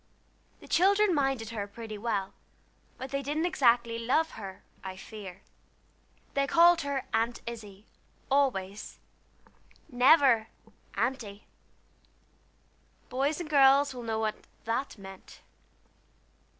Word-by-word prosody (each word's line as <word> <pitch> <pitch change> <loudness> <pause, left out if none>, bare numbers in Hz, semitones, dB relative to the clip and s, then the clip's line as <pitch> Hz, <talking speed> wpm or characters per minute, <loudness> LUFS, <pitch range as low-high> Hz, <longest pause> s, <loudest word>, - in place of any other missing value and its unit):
The - - -13
children 400 +2 +4
minded 270 -6 0
her 210 -3 -4
pretty 220 +1 -8
well, 205 -4 -2 0.6
but 260 0 -7
they 275 0 -1
didn't 295 +4 -1
exactly 235 -7 +2
love 275 +8 +1
her, 195 -3 -9 0.2
I 190 -1 -7
fear. 195 -2 -10 0.9
They 275 0 +1
called 340 +1 +5
her 280 -2 -3
"Aunt 230 +2 0
Izzie" 215 -3 -9 0.5
always, 215 -8 0 0.9
never 255 -3 +5 0.5
"Aunty." 215 -6 -2 1.6
Boys 280 +5 0
and 345 - -5
girls 280 -1 +5
will 250 - -7
know 225 -2 -2
what 215 -1 -3 0.2
that 230 +4 -2
meant. 195 -1 -12
240 Hz, 110 wpm, -29 LUFS, 215-280 Hz, 1.6 s, called